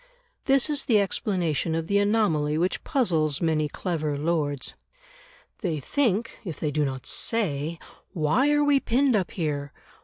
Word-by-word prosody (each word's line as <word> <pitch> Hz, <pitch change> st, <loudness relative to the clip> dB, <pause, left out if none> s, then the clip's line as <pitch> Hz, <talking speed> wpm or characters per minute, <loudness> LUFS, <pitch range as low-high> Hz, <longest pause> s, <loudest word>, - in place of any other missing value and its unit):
This 270 Hz, -1 st, +3 dB
is 295 Hz, -2 st, 0 dB
the 220 Hz, -4 st, +4 dB
explanation 180 Hz, -, -1 dB
of 165 Hz, 0 st, -2 dB
the 200 Hz, +4 st, +2 dB
anomaly 200 Hz, -8 st, +1 dB
which 180 Hz, +3 st, -1 dB
puzzles 165 Hz, -, +1 dB
many 155 Hz, -2 st, +1 dB
clever 155 Hz, -4 st, -2 dB
lords. 145 Hz, -3 st, -1 dB, 0.8 s
They 170 Hz, -8 st, -2 dB
think, 230 Hz, -, 0 dB
if 175 Hz, -7 st, -6 dB
they 150 Hz, -, -1 dB
do 150 Hz, 0 st, +1 dB
not 130 Hz, -2 st, -3 dB
say, 165 Hz, -8 st, -1 dB, 0.3 s
"Why 175 Hz, -, +2 dB
are 295 Hz, 0 st, +3 dB
we 290 Hz, -1 st, +4 dB
pinned 260 Hz, 0 st, +2 dB
up 190 Hz, -4 st, 0 dB
here? 145 Hz, -5 st, -3 dB
170 Hz, 150 wpm, -26 LUFS, 150-225 Hz, 0.8 s, the